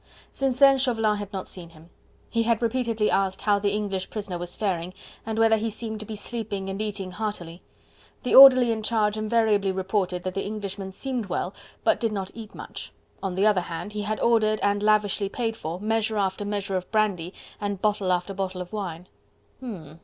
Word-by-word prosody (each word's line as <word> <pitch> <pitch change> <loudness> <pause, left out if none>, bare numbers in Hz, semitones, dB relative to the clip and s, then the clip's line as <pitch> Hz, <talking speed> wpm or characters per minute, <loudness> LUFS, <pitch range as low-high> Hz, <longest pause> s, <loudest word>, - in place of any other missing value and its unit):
Since 270 -2 0
then 275 0 +6
Chauvelin 225 -5 +2
had 205 -1 -6
not 190 -3 -5
seen 175 -3 -8
him. 165 +1 -18 0.4
He 230 - +1
had 230 0 +1
repeatedly 230 -2 +1
asked 195 -1 0
how 205 -1 +3
the 200 0 +1
English 200 -2 -2
prisoner 200 -5 -4
was 175 0 -4
faring, 185 -3 -2 0.3
and 220 -1 -2
whether 225 0 +5
he 225 +1 -1
seemed 220 0 -5
to 215 - -6
be 220 - -5
sleeping 205 -3 -4
and 195 +2 -4
eating 200 -3 -3
heartily. 180 -4 -5 0.6
The 250 - -1
orderly 255 -3 +10
in 220 -1 -2
charge 215 -1 +1
invariably 215 -2 +2
reported 190 -1 -1
that 185 - -3
the 195 - -2
Englishman 200 -2 -5
seemed 250 +1 -2
well, - - -2 0.3
but - - +3
did 230 -2 0
not 195 -2 -4
eat 225 -2 -10
much. - - -7 0.3
On 190 -2 -3
the 195 +2 +2
other 210 -4 +4
hand, 175 +4 -6
he 210 - -3
had 215 +1 -2
ordered, 215 -2 +3
and 205 0 +2
lavishly 210 -1 +2
paid 225 0 -2
for, 170 -4 -5
measure 220 +1 0
after 195 0 -1
measure 200 -1 -2
of 185 -1 -3
brandy 200 -6 +1 0.3
and 205 -2 -3
bottle 205 -2 +1
after 180 +2 0
bottle 190 -1 -3
of 180 +3 -8
wine. 180 -4 -5 0.5
"Hm! 170 - -8
205 Hz, 200 wpm, -25 LUFS, 190-220 Hz, 0.6 s, orderly